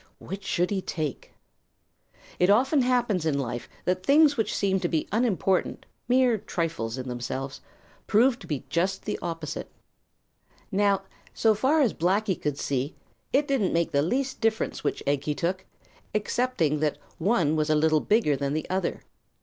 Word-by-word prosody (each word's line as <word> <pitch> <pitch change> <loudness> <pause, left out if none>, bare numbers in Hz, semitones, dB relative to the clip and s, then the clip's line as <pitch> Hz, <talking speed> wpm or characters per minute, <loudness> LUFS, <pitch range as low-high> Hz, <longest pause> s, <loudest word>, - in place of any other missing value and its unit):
Which 195 +2 -7
should 180 -1 0
he 195 -2 0
take? 155 -7 -4 1.1
It 180 - +4
often 265 +7 +4
happens 245 -8 +1
in 160 -2 +1
this 140 - 0
life 120 -1 -5 0.2
that 185 0 0
things 290 +4 +5
which 220 -4 0
seem 190 -1 +1
to 175 - 0
be 160 -2 -1
unimportant, 200 -4 0 0.2
mere 250 -3 +3
trifles 160 -12 -3
in 130 0 -5
themselves, 130 +2 -4 0.5
prove 240 +4 +4
to - - -12
be 145 -4 -3
just 180 +6 -1
the - - -2
opposite. 165 -3 -5 1.0
Now, 200 0 +2 0.3
so 220 -1 +4
far 270 +9 +2
as 245 -7 +3
Blacky 190 +4 +1
could 150 -2 -1
see, 140 +1 -2 0.4
it 285 +2 +2
didn't 260 -9 +1
make 170 0 +1
the 140 - +2
least 260 - -1
difference 225 -1 0
which - - -2
egg 140 0 0
he 150 - -1
took, 185 +4 -2 0.5
excepting 210 - 0
that 150 -1 0 0.2
one 170 -5 +2
was 155 0 0
a 155 - +4
little 155 0 +3
bigger 210 -9 +2
than 140 +1 -2
the 155 0 -2
other. 190 -1 -1
185 Hz, 165 wpm, -26 LUFS, 150-225 Hz, 1.1 s, things